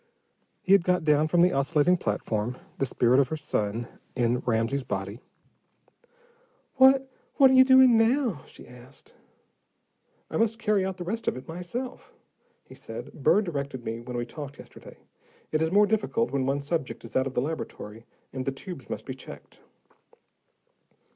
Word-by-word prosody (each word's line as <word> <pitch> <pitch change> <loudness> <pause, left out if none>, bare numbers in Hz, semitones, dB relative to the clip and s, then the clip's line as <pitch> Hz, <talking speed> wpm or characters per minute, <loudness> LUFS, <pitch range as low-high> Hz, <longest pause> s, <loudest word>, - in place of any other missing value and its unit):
He 190 - -1
had 195 -3 +6
got 180 -1 +1
down 150 0 +3
from 170 +2 +3
the 180 +1 +4
oscillating 150 +5 +2
platform, 110 - -2 0.2
the 135 - +1
spirit 125 +1 +3
of 140 - +3
her 160 - -4
son 115 -5 -2 0.3
in 120 -1 +1
Ramsey's 120 +3 -1
body. 100 -1 -4 1.6
"What 265 +1 +6 0.3
what 270 -2 +6
are - - +3
you 260 0 +8
doing 260 -2 +6
now?" 225 - +2
she - - -14
asked. 125 - -16 1.2
"I - - -1
must 225 0 +1
carry 210 -4 +1
out 190 -1 -3
the 180 - -5
rest 225 +6 -4
of - - 0
it 130 - -10
myself," 180 +10 -6 0.5
he - - -14
said. - - -9
"Burr 210 - +3
directed 140 - -5
me 115 +1 -4
when 120 +1 -6
we 120 - -2
talked 140 +3 -9
yesterday. - - -13 0.5
It 155 - 0
is 160 0 +1
more 205 +2 +5
difficult 220 +2 0
when 135 -1 -1
one 140 +1 0
subject 140 -6 -4
is 115 - -12
out 130 +1 +2
of 130 - -7
the - - +2
laboratory, 115 -7 -6 0.3
and 130 -1 -3
the 135 - -1
tubes 135 0 -9
must - - -5
be - - -5
checked." - - -13
150 Hz, 170 wpm, -27 LUFS, 125-200 Hz, 1.6 s, you